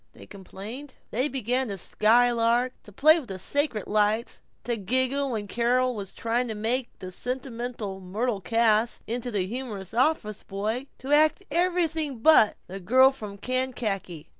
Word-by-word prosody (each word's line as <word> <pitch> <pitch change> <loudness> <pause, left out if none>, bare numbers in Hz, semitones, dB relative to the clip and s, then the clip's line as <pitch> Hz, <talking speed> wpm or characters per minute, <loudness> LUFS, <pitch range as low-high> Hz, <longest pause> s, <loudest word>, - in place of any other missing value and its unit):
they - - -13
complained. 210 +8 -9 0.2
They 255 +5 +1
began 255 -1 -1
to 200 -2 -4
skylark; 235 +4 +3
to 210 - -15
play 310 - +5
with 265 - -11
the 190 - -4
sacred 265 +1 0
lights; 215 +2 0 0.2
to 240 - -1
giggle 260 +6 0
when 220 -4 -3
Carol 250 +4 +1
was 200 -4 -6
trying 235 +2 -1
to 220 - -4
make 235 +4 -1
the 185 - -8
sentimental 240 -3 -5
Myrtle 205 +3 -2
Cass 225 +1 +2
into 245 +2 -3
a 185 - 0
humorous 215 -3 -6
office 240 -4 +1
boy; 220 +7 -3
to 270 - -7
act 310 +6 +4
everything 330 -5 0
but 225 -3 +5
"The 190 +2 -8
Girl 260 +8 +5
from 210 -7 -8
Kankakee." 220 -9 -3
235 Hz, 155 wpm, -26 LUFS, 210-260 Hz, 0.2 s, play